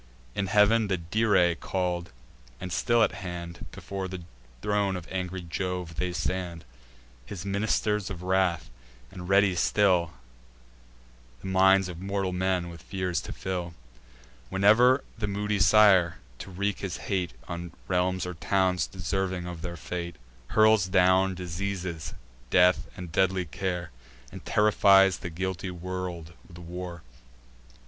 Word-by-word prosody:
In 100 Hz, -, -2 dB
heav'n 105 Hz, +2 st, +4 dB
the 95 Hz, -2 st, 0 dB
Dirae 90 Hz, 0 st, +2 dB
call'd, 90 Hz, -2 st, -2 dB, 0.5 s
and 90 Hz, -1 st, -5 dB
still 120 Hz, +6 st, +3 dB
at -, -, +2 dB
hand, 85 Hz, -2 st, -7 dB
Before 95 Hz, 0 st, -6 dB
the 90 Hz, -1 st, -7 dB, 0.4 s
throne 100 Hz, -2 st, +1 dB
of 90 Hz, -2 st, -7 dB
angry 95 Hz, -1 st, -3 dB
Jove 90 Hz, -1 st, -4 dB
they 90 Hz, +1 st, -1 dB
stand, 90 Hz, -2 st, -3 dB, 0.6 s
His 90 Hz, +7 st, -8 dB
ministers 105 Hz, +1 st, 0 dB
of 90 Hz, -3 st, -7 dB
wrath, 95 Hz, -3 st, +1 dB, 0.4 s
and 90 Hz, -1 st, -8 dB
ready 100 Hz, -1 st, +4 dB
still 90 Hz, -2 st, +2 dB, 1.3 s
The 95 Hz, -, -6 dB
minds 95 Hz, 0 st, +5 dB
of 85 Hz, -2 st, -7 dB
mortal 95 Hz, -1 st, -2 dB
men 90 Hz, -1 st, 0 dB
with 85 Hz, -2 st, -11 dB
fears 90 Hz, -4 st, -2 dB
to -, -, -8 dB
fill, 90 Hz, -3 st, -4 dB, 0.7 s
Whene'er 110 Hz, +7 st, +5 dB, 0.2 s
the 105 Hz, -, -1 dB
moody 105 Hz, +1 st, -1 dB
sire, 100 Hz, -5 st, +5 dB, 0.2 s
to -, -, -8 dB
wreak 100 Hz, +2 st, -2 dB
his 95 Hz, -3 st, -4 dB
hate 90 Hz, -7 st, -1 dB
On 85 Hz, 0 st, -6 dB, 0.2 s
realms 90 Hz, 0 st, 0 dB
or 90 Hz, -, -4 dB
towns 95 Hz, +1 st, +1 dB
deserving 95 Hz, 0 st, -3 dB
of 90 Hz, -2 st, -7 dB
their 85 Hz, -1 st, -5 dB
fate, 85 Hz, 0 st, -5 dB, 0.3 s
Hurls 110 Hz, -3 st, +4 dB
down 95 Hz, 0 st, +3 dB
diseases, 90 Hz, -1 st, -4 dB, 0.3 s
death 90 Hz, +2 st, +4 dB
and 90 Hz, -2 st, -7 dB
deadly 95 Hz, +1 st, +1 dB
care, 90 Hz, 0 st, -4 dB, 0.4 s
And -, -, -10 dB
terrifies 100 Hz, -3 st, +4 dB
the 85 Hz, -, -5 dB
guilty 95 Hz, +2 st, -3 dB
world 90 Hz, -2 st, -5 dB, 0.2 s
with 85 Hz, -, -13 dB
war. 85 Hz, 0 st, -7 dB
95 Hz, 135 wpm, -27 LUFS, 90-95 Hz, 1.3 s, minds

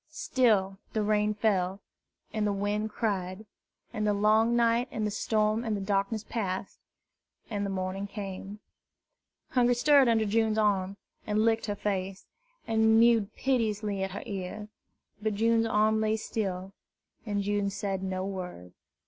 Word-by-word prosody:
Still 215 Hz, -, +1 dB
the 215 Hz, -, 0 dB
rain 210 Hz, 0 st, +1 dB
fell, 195 Hz, -3 st, +1 dB, 0.5 s
and 215 Hz, -1 st, 0 dB
the -, -, +1 dB
wind 205 Hz, +2 st, -1 dB
cried; 200 Hz, -2 st, -2 dB, 0.5 s
and 215 Hz, 0 st, -1 dB
the 205 Hz, -, +2 dB
long 215 Hz, +3 st, +3 dB
night 235 Hz, +1 st, +3 dB
and 215 Hz, -2 st, -3 dB
the 210 Hz, -, -1 dB
storm 215 Hz, +1 st, +1 dB
and 220 Hz, -3 st, -1 dB
the -, -, -4 dB
darkness 200 Hz, +2 st, -1 dB
passed, 195 Hz, -4 st, -4 dB, 0.7 s
and 205 Hz, -1 st, -1 dB
the 200 Hz, -, -2 dB
morning 190 Hz, +1 st, -3 dB
came. 200 Hz, 0 st, -7 dB, 0.9 s
Hungry 245 Hz, -1 st, +3 dB
stirred 280 Hz, +1 st, +5 dB
under 225 Hz, -2 st, +3 dB
June's 220 Hz, +1 st, +1 dB
arm, 200 Hz, -2 st, +1 dB, 0.3 s
and 215 Hz, +1 st, +2 dB
licked 225 Hz, -1 st, +1 dB
her 205 Hz, -, -1 dB
face, 195 Hz, -1 st, -3 dB, 0.4 s
and 220 Hz, 0 st, +4 dB
mewed 230 Hz, -3 st, +4 dB
piteously 215 Hz, -6 st, 0 dB
at 190 Hz, -, -1 dB
her 200 Hz, -, -5 dB
ear. 200 Hz, +2 st, -5 dB, 0.5 s
But 215 Hz, -1 st, -1 dB
June's 225 Hz, +1 st, +2 dB
arm 220 Hz, 0 st, +2 dB
lay 220 Hz, 0 st, +1 dB
still, 195 Hz, -4 st, -3 dB, 0.5 s
and 205 Hz, -3 st, -2 dB
June 205 Hz, 0 st, 0 dB
said 195 Hz, -1 st, -3 dB
no 190 Hz, 0 st, -2 dB
word. 180 Hz, -, -6 dB
210 Hz, 150 wpm, -29 LUFS, 195-220 Hz, 0.9 s, stirred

